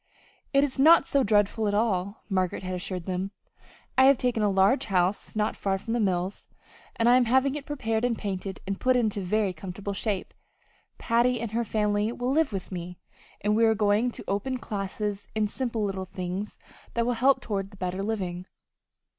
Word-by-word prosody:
"It 275 0 +4
is 275 -2 -2
not 315 +1 +7
so 280 -1 +2
dreadful 210 +1 +2
at 205 - 0
all," 200 -2 0
Margaret 185 -2 -1
had 185 0 -3
assured 180 -1 -4
them. 185 +1 -2 0.7
"I 260 - +8
have 275 0 +6
taken 245 -3 0
a 210 - +3
large 195 +7 +3
house 185 +1 0
not 215 0 0
far 195 -1 -1
from 225 +4 -5
the 240 - +1
mills, 190 -2 -1 0.5
and 230 - +1
I 245 +1 +7
am 255 - +3
having 265 +3 +3
it 290 -1 -6
papered 225 -6 -1
and 240 -2 +1
painted 195 -1 -4
and 195 0 -3
put 255 0 +3
into 215 -4 +1
very 195 +1 0
comfortable 190 +3 -6
shape. 200 -1 -2 0.6
Patty 240 +1 +2
and 230 -2 -4
her 235 +2 0
family 210 0 0
will 245 +1 -2
live 305 -1 +2
with 195 -1 -5
me, 180 -1 -6 0.4
and 210 +1 +1
we 230 - +3
are 220 -1 +4
going 210 +3 +2
to - - -8
open 205 +7 -1
classes 205 -2 -4
in 215 -1 +2
simple 230 -1 -2
little 190 -1 -3
things 185 +2 -5 0.4
that 235 -1 +1
will 245 - +1
help 260 +3 +3
toward 200 -4 -4
better 185 0 -3
living." 185 -4 -3
210 Hz, 190 wpm, -27 LUFS, 195-235 Hz, 0.7 s, I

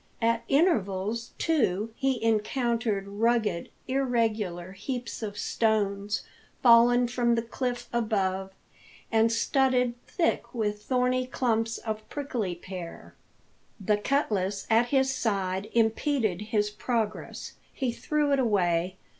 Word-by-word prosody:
At 230 0 +2
intervals, 230 - +1
too, 225 - +1
he 265 -3 0
encountered 225 -2 0
rugged, 210 -3 0 0.2
irregular 225 -9 0
heaps 240 +6 -5
of 205 -2 -5
stones, 205 -2 0 0.4
fallen 240 0 +6
from 240 -1 +1
the 230 - 0
cliff 245 +1 -3
above, 195 -5 0 0.6
and 225 0 +4
studded 250 +1 +2
thick 330 -5 -1
with 210 -2 -1
thorny 255 +1 +1
clumps 225 -3 0
of 215 -1 -5
prickly 245 -11 -3
pear. 175 -1 -9 0.7
The 205 +1 +1
cutlass 205 -6 0
at 230 +2 +4
his 265 0 +2
side 195 -4 -1
impeded 225 - +1
his 210 -1 +1
progress. 220 -1 -3 0.2
He 260 -3 -2
threw 295 +4 0
it 275 - +3
away. 185 -6 +1
225 Hz, 115 wpm, -28 LUFS, 205-245 Hz, 0.7 s, fallen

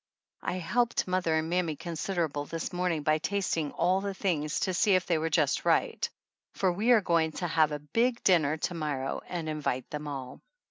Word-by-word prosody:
I - - -2
helped 235 +7 0
mother 180 -3 +1
and 160 0 0
mammy 170 -2 0
considerable 165 -2 -2
this 165 +4 -5
morning 175 -4 0
by 155 +1 +2
tasting 165 -5 -1
all 185 +3 +2
the 200 -1 -3
things 155 -7 -1
to 185 - 0
see 200 +1 +4
if 185 - +1
they 170 -3 +1
were 165 +1 -1
just 150 -4 +2
right, - - +1 0.5
for 185 -2 +2
we 210 +7 0
are 235 -3 +7
going 165 -3 +1
to 175 - -3
have 155 -2 +3
a 150 - -2
big 230 - 0
dinner 160 -5 +4
to 170 - -2
morrow 145 -5 -2
and 170 -3 -4
invite 150 -5 -2
them 150 0 -5
all. 135 -3 -6
165 Hz, 195 wpm, -29 LUFS, 150-185 Hz, 0.5 s, are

